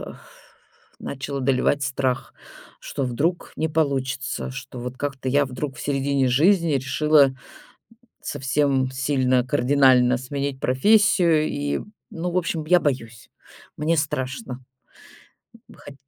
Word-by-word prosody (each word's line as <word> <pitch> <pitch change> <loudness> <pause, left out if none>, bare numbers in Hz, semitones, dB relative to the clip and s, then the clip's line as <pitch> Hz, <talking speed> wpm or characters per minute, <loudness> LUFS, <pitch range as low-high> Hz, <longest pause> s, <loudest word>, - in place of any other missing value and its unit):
Э. - - -8 0.9
Начал 140 +1 -5
одолевать 135 +2 +1
страх, 130 -2 -2 0.4
что 135 - -4
вдруг 155 +8 -2
не 160 - -1
получится, 135 -5 -2
что 130 -1 -8
вот 125 +1 -6
как-то 135 -2 -3
я 145 +1 +3
вдруг 130 +1 -5
в - - -9
середине 140 -1 0
жизни 165 +5 +3
решила 140 +1 +3 0.9
совсем 135 0 0
сильно 130 -2 +1
кардинально 130 -2 +4
сменить 140 +1 -4
профессию 170 +2 +3
и, 145 0 -2 0.3
ну, 175 +1 -4
в - - -2
общем, 165 -3 -1
я 180 +2 +5
боюсь, 115 -6 -3 0.5
мне 160 +2 0
страшно. 130 - -3 1.0
Хоть 145 - -13
140 Hz, 115 wpm, -23 LUFS, 130-150 Hz, 1.0 s, я